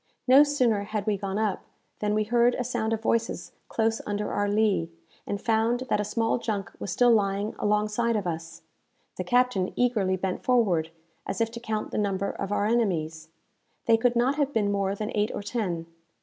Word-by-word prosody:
No 260 +3 +8
sooner 255 -8 +1
had 210 -1 -3
we 215 -2 +1
gone 195 0 -3
up, 215 -3 0 0.4
than 210 0 0
we 215 - +2
heard 240 +2 +3
a 250 - -2
sound 235 -2 -2
of 225 0 -2
voices 230 0 -1 0.2
close 225 0 0
under 205 0 -2
our 205 0 0
lee, 205 -5 +2 0.4
and 205 - -2
found 230 +2 +1
that - - +3
a - - +1
small 225 +3 0
junk 205 -5 -3
was - - -5
still 245 +6 +4
lying 200 -1 +1
alongside 210 +3 +1
of 205 -3 -1
us. 165 -1 -5 0.5
The - - -2
captain 245 -7 +2
eagerly 215 -7 +1
bent 185 0 -3
forward, 195 -11 +2 0.4
as 195 - -3
if 225 0 +1
to 235 - -7
count 220 -2 -3
the - - -1
number 200 -1 -1
of 195 - -5
our 205 0 +1
enemies. 165 -9 0 0.6
They 225 - +5
could 240 +2 +2
not 255 +4 +2
have 285 -2 +1
been 210 -6 +1
more 200 -1 0
than 215 +2 -4
eight 210 0 +1
or - - -5
ten. 190 -7 -2
215 Hz, 195 wpm, -27 LUFS, 200-235 Hz, 0.6 s, No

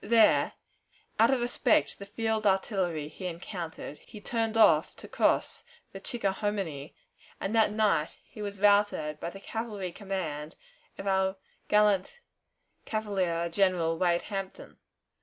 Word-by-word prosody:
There, 225 0 +4 0.7
out - - +6
of 265 -2 +2
respect 240 0 +2
to - - -9
the 200 - -7
field 220 0 -1
artillery 190 -6 0
he 185 +4 -7
encountered, 170 -3 -6
he 210 - -12
turned 225 +1 -1
off 160 -8 +5
to - - -11
cross - - +1 0.3
the 195 - -9
Chickahominy, 195 - -2 0.4
and 195 - -3
that 220 -2 +4
night 210 -7 +1
he 215 - -12
was 200 -1 -5
routed 200 -7 +3
by 170 - -4
the 195 - -10
cavalry 210 -3 -4
command 170 -6 -4 0.4
of - - -7
our 190 0 +1 0.3
gallant 210 - +3 0.6
cavalier 190 -6 -1
General 170 -2 +1
Wade 175 0 +1
Hampton. 195 -2 -6
195 Hz, 135 wpm, -29 LUFS, 170-210 Hz, 0.7 s, out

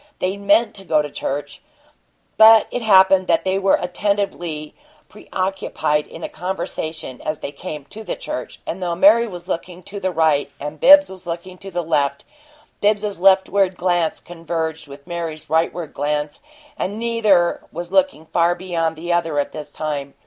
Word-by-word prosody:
They 185 +1 -1
meant 205 +3 +2
to 195 - -7
go 155 -4 +2
to 145 - -7
church. 145 +1 -4 0.7
But 220 0 +8
it 245 - -3
happened 190 -3 +5
that 165 - +2
they 190 +1 0
were 195 0 +3
attentively 175 -4 -2 0.4
preoccupied 160 -5 -2
in - - -11
a - - -2
conversation 160 -6 -5
as 155 0 -3
they - - -5
came 150 -1 -7
to 220 - -8
the - - -4
church; 125 - -6
and 185 - -5
though 175 -1 -1
Mary 215 +6 +5
was 175 -4 -9
looking 180 0 -5
to 200 +3 -7
the 190 -1 -1
right 160 -4 +2
and 150 +2 -6
Bibbs 290 +2 +8
was 185 -2 -11
looking 175 +2 -6
to 195 - -9
the 175 -2 -3
left, 140 -3 0 0.6
Bibbs's 205 -2 +1
leftward 190 0 +3
glance 175 -2 0
converged 165 -2 -5
with 140 0 -12
Mary's 170 -3 -5
rightward 160 0 0
glance, 150 0 -2 0.4
and 200 +3 -2
neither 220 -7 +2
was 175 +2 -6
looking 275 - +1
far 170 +1 +2
beyond 170 -3 -2
the 175 +2 -2
other 165 -3 0
at 145 - 0
this 150 -1 -8
time. 145 -3 -4
175 Hz, 170 wpm, -20 LUFS, 155-195 Hz, 0.7 s, But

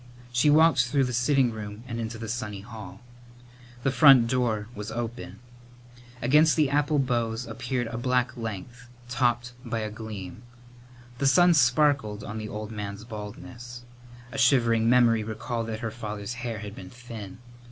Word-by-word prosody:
She 125 +4 +4
walked 155 -4 +5
through 140 +2 +2
the 125 -1 -2
sitting 125 +1 +3
room 105 0 -7
and 115 -2 -4
into 115 0 -4
the 115 0 -6
sunny 105 -3 -4
hall. 105 -2 -10 0.8
The 135 - +2
front 135 -4 +7
door 115 -4 0
was 105 0 -6
open. 115 -5 -5 0.9
Against 150 +5 +5
the 150 -4 +2
apple 145 +1 +2
boughs 120 -3 0
appeared 120 +2 -3
a 115 +1 -5
black 125 0 0
length, 120 +2 -7 0.2
topped 120 -1 0
by 115 -2 -3
a 105 0 -4
gleam. 105 -3 -8 0.8
The 140 - +2
sun 175 +5 +6
sparkled 125 -5 +2
on 110 +1 -5
the 110 0 -6
old 105 +1 -6
man's 105 -1 -6
baldness. 110 +2 -9 0.5
A 135 - -5
shivering 115 -3 +4
memory 120 -3 +4
recalled 110 +2 -4
that 110 0 -5
her 115 -2 -3
father's 105 -1 -5
hair 120 -2 -3
had 105 -1 -7
been 95 -3 -10
thin. 115 -6 -9
115 Hz, 160 wpm, -27 LUFS, 110-125 Hz, 0.9 s, front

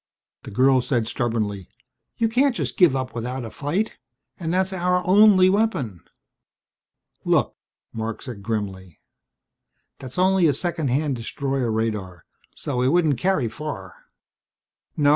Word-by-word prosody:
The - - -9
girl 130 +4 +4
said 120 -4 -1
stubbornly, 110 -6 -2 0.5
"You 230 - +2
can't 255 +3 +2
just - - -2
give 175 - +5
up 130 -1 -3
without 125 +2 -4
a 110 - -8
fight. 175 +10 -2 0.4
And 165 -2 -3
that's 190 +2 +1
our 180 0 0
only 195 -1 +6
weapon." 185 - 0 1.2
"Look," - - +1 0.4
Marc 110 0 -4
said 120 -7 -8
grimly, 95 -6 -4 1.0
"that's 130 +3 -9
only 185 -1 +4
a 145 - +2
second 165 -2 -2
hand 135 +1 0
destroyer 135 +1 -2
radar, 105 -6 -3 0.3
so 130 -4 -3
it 125 - +2
wouldn't 155 -4 +2
carry 185 -6 +1
far. 110 -6 -6 1.0
No. 145 -2 +4
135 Hz, 135 wpm, -23 LUFS, 115-180 Hz, 1.2 s, only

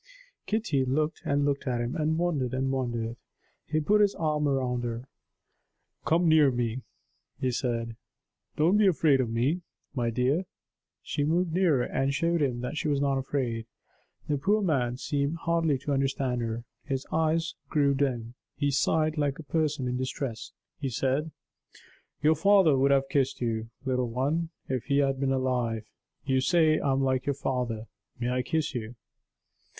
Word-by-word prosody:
Kitty 205 - +1
looked 150 +4 0
and 140 0 +1
looked 140 -1 -1
at 125 -2 0
him, 120 +5 -2
and 160 -1 0
wondered 145 -8 0
and 135 +1 0
wondered. 120 -3 -2 0.5
He 155 - +1
put 210 +8 +3
his 205 -1 +3
arm 150 -2 0
round 125 -3 0
her. 120 +2 -4 1.0
"Come 170 +2 +3
near 155 -3 +6
to 125 - -3
me," 120 +1 -1 0.6
he 130 - 0
said. 115 -2 -2 0.6
"Don't 170 +7 +4
be 210 -1 +5
afraid 150 -6 +4
of 120 - -2
me, 130 +10 0 0.3
my 120 -4 0
dear." 130 +10 +1 0.6
She 145 - -2
moved 165 +3 +1
nearer 165 -8 +3
and 135 +2 0
showed 170 +1 +1
him 125 -4 0
that 125 +5 -4
she 155 - -1
was 145 -2 +1
not 140 -1 +1
afraid. 125 -4 -2 0.6
The 145 -2 0
poor 205 +7 +2
man 125 -8 +1
seemed 140 +2 -1
hardly 165 -3 +1
to 140 +2 -3
understand 135 -2 0
her. 115 0 -3 0.2
His 135 -3 -3
eyes 160 +1 +1 0.2
grew 140 -3 +3
dim; 125 -4 -1 0.2
he 145 -1 0
sighed 155 +2 +1
like 145 -2 0
a 160 - -8
person 150 -4 0
in 125 0 -1
distress; 130 -2 -4 0.3
he 140 -3 -2
said: 135 +6 0 0.9
"Your 155 +1 +6
father 190 -2 +5
would 135 +1 +3
have 135 -1 +3
kissed 135 -3 0
you, 115 -2 -2 0.2
little 125 -2 0
one, 145 +8 -1 0.2
if 130 -3 -2
he 140 -1 +1
had 135 -2 +2
been 135 -1 +1
alive. 125 -4 0 0.4
You 130 -1 +2
say 155 +1 +3
I 140 - 0
am 135 0 +1
like 130 0 0
your 140 - +1
father. 125 -5 -2 0.3
May 120 0 -1
I 125 0 +1
kiss 150 +4 -1
you?" 120 -1 -5
135 Hz, 170 wpm, -28 LUFS, 125-155 Hz, 1.0 s, near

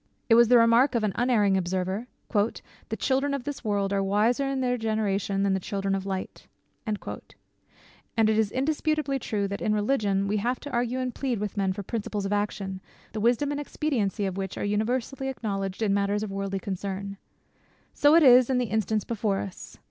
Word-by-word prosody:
It - - +6
was 235 0 +7
the 245 +1 +6
remark 235 +3 +5
of 230 - +1
an 210 - +1
unerring 225 -5 +2
observer, 190 +4 -1 0.3
"The 210 +1 -2
children 280 +1 +1
of 275 - -5
this 290 0 -5
world 200 -2 0
are 195 - +1
wiser 215 +7 +2
in 270 -1 -1
their 250 -1 +1
generation 205 -3 -1
than 200 -1 +2
the 190 - +1
children 195 +1 -2
of 195 0 -2
light." 190 -1 -5 0.4
And 215 +1 -5
it - - +3
is 215 -2 +2
indisputably 295 0 0
true, 205 -4 -2
that 200 +1 -5
in 215 - +1
religion 205 -3 +1
we 210 +1 0
have 240 +4 -1
to 290 - -7
argue 245 +1 0
and 255 -1 -2
plead 260 -4 -2
with 205 -1 -4
men 195 -2 +1
for 200 +2 -5
principles 210 -1 -3
of 195 - -1
action, 200 -2 -2 0.3
the 215 - -4
wisdom 245 +6 +2
and 290 0 -2
expediency 230 -9 -1
of 190 -1 -3
which 190 -1 -4
are - - -2
universally 240 +6 -1
acknowledged 200 -5 -3
in 200 -2 +2
matters 200 +1 0
of 210 - -4
worldly 195 0 -3
concern. 195 +1 -5 0.8
So 290 +2 +5
it 335 - +6
is 250 -2 +7
in 260 - +2
the 245 -4 -1
instance 220 -1 0
before 215 -3 -1
us. 195 -2 -7
215 Hz, 195 wpm, -27 LUFS, 195-250 Hz, 0.8 s, was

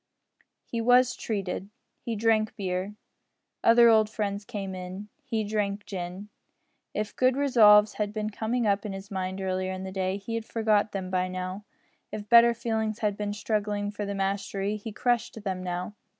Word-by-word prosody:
He 230 - -3
was 250 +2 +4
"treated." 195 -2 -3 0.3
He 230 -2 -4
drank 220 0 +2
beer. 190 0 -3 0.7
Other 235 +1 +7
old 220 -2 +5
friends 205 -2 -3
came 195 -2 -5
in. 185 +3 -7
He 230 -5 -1
drank 205 -1 -2
gin. 185 +2 -6 0.7
If 210 0 -3
good 255 +1 +3
resolves 215 -7 +6
had 205 -1 0
been 215 0 -3
coming 230 +3 -1
up 200 -1 +2
in 210 -3 -4
his 195 +2 -9
mind 190 0 -3
earlier 185 0 -1
in 185 0 -5
the 190 - -5
day 190 0 -1
he 230 +3 -4
forgot 220 -2 +1
them 190 -2 -4
now. 185 +2 -2 0.5
If 210 -1 -6
better 235 +1 +7
feelings 220 -2 -1
had 210 -3 0
been 205 0 -3
struggling 205 -1 -1
for 205 0 -5
the 200 - -3
mastery, 195 +1 -1
he 215 +1 -7
crushed 235 -1 -1
them 190 -2 -3
now. 180 +2 -4
205 Hz, 165 wpm, -27 LUFS, 195-220 Hz, 0.7 s, Other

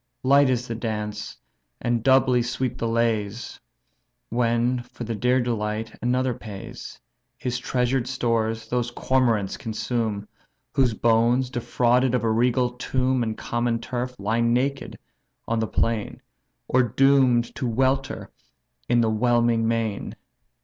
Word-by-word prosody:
Light 140 +1 +5
is 125 -1 0
the 115 - -3
dance, 105 -2 -4 0.4
and 120 -1 0
doubly 130 0 +4
sweet 125 +1 -2
the 115 - -1
lays, 115 -1 -1 0.7
When 120 +1 +1
for 120 0 -9
the 115 0 -3
dear 125 +4 +2
delight 110 -2 -2
another 125 +1 +1
pays. 105 -4 -9 0.4
His 125 -3 -3
treasured 125 0 0
stores 115 -3 -1
those 120 -1 0
cormarants 120 -5 +1
consume, 110 -2 -2 0.5
Whose 125 -5 +2
bones, 120 +3 +2
defrauded 125 +1 +2
of 120 - 0
a 115 - +2
regal 125 +2 +2
tomb 130 +1 0
And 110 -2 -2
common 120 0 -1
turf, 125 +1 -4
lie 110 +4 0
naked 125 +4 0 0.5
on 115 0 0
the 110 - 0
plain, 115 -1 -1 0.5
Or 130 - +4
doom'd 125 0 +3
to 130 - -3
welter 130 +3 0 0.6
in 120 0 +4
the 115 - +2
whelming 115 0 +2
main. 115 -3 -2
120 Hz, 130 wpm, -24 LUFS, 115-125 Hz, 0.7 s, Light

